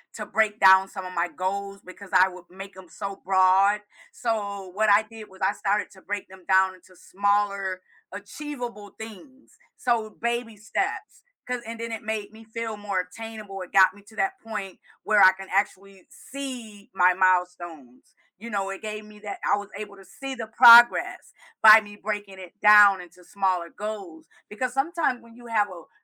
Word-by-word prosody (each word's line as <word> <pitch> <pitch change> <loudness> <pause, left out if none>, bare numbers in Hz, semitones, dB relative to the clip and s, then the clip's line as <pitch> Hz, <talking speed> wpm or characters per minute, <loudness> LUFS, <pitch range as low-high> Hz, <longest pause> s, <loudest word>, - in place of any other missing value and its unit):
to 215 - -6
break 215 +1 0
down 190 0 +7
some 190 -2 -8
of 185 - -8
my 170 +1 0
goals 200 +1 -5
because 185 +1 -12
I 185 0 +5
would 180 -1 -12
make 195 +1 -11
'em 185 -2 -14
so 195 +2 -7
broad. 190 +2 +3 0.3
So, 200 -4 -4
what 210 +3 0
I 205 +2 +5
did 215 -1 -13
was 190 0 -18
I 190 +2 +1
started 205 0 -2
to 190 - -17
break 205 0 -5
them 190 -1 -16
down 190 0 +3
into 185 0 -20
smaller 200 -1 -1 0.3
achievable 245 -9 -8
things, 225 +5 -13 0.2
so 235 -4 -1
baby 235 -1 -4
steps, 220 - -4 0.2
'cause, 250 -1 -4
and 230 0 -7
then 230 0 -5
it 225 - -5
made 215 -1 -5
me 225 +1 -14
feel 225 -1 -6
more 200 -3 -2
attainable, 210 +1 -9
it 185 - -9
got 190 -1 +6
me 205 - -17
to 220 +2 -18
that 385 0 -2
point 200 -4 -7 0.2
where 210 -2 +3
I 185 - +8
can 195 0 -11
actually 195 -1 -3
see 245 -7 -9
my 180 -1 +4
milestones, 180 -8 -2 0.2
you 235 +3 -9
know, 195 -2 -2
it 195 - -7
gave 215 0 -6
me 210 0 -16
that 205 -1 -8
I 205 - +2
was 205 0 -8
able 200 -1 -9
to 195 - -16
see 270 -1 -8
the 235 - -6
progress 235 +1 +6 0.3
by 220 0 +9
me 205 -1 -12
breaking 205 -2 -5
it 185 +2 -13
down 205 -3 +7
into 180 0 -16
smaller 185 -4 -1
goals 200 -6 -8 0.2
because 245 +4 -4
sometimes 275 -3 -1
when 230 0 -18
you 240 0 -14
have 210 -3 +1
o 170 -3 -12
205 Hz, 185 wpm, -25 LUFS, 190-220 Hz, 0.3 s, by